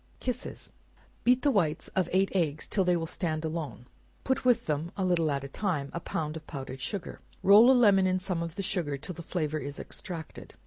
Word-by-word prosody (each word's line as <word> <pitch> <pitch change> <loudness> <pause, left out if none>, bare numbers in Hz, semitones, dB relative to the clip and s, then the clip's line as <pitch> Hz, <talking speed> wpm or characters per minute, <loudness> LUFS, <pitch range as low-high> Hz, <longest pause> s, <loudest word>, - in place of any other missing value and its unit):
Kisses. 250 0 -4 0.5
Beat 250 +1 +4
the 290 - +4
whites 165 - +1
of 185 -3 0
eight 190 +1 +2
eggs 160 -5 0
till 195 - +1
they 180 -1 +3
will 165 - -2
stand 160 -1 -2
alone; 155 -7 -4 0.4
put 265 - 0
with 250 -2 +3
them, 155 +3 -2
a 190 - 0
little 170 -3 +2
at 140 -1 -1
a - - -5
time, 150 -3 -2
a 170 - -2
pound 155 -2 -3
of 160 -1 -9
powdered 135 -3 -7
sugar; 180 +7 -4 0.2
roll 210 +5 +8
a - - +8
lemon 200 -5 +5
in 185 0 +2
some 185 -2 -2
of 165 -1 -4
the 195 - -3
sugar 160 -7 -1
till 180 - -6
the 170 - -8
flavor 155 -3 -2
is 140 0 -6
extracted. 170 -5 -7
170 Hz, 215 wpm, -29 LUFS, 155-195 Hz, 0.5 s, roll